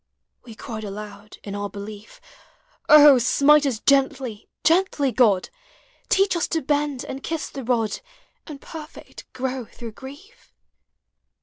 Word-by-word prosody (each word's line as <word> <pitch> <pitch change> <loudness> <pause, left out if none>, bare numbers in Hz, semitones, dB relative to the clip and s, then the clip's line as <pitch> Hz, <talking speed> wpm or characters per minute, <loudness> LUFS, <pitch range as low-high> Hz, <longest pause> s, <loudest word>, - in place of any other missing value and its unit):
We 230 -3 -11
cried 220 -1 -7
aloud 205 0 -9
in 200 - -7
our 205 0 -4
belief, 205 - -10 0.4
" - - -38
O, 295 -3 +8
smite 290 +4 +4
us 250 -5 -1
gently, 265 -3 0
gently, 325 -6 +2
God! 210 -6 +2 0.6
Teach 390 -1 +2
us 340 - 0
to 325 -3 -2
bend 290 -1 -1
and 270 - -7
kiss 325 +1 -4
the 270 - -7
rod, 225 -4 -1 0.5
And 295 -4 -9
perfect 310 0 -11
grow 255 -1 -4
through 230 +1 -10
grief." 285 - -14
265 Hz, 135 wpm, -23 LUFS, 215-295 Hz, 0.6 s, O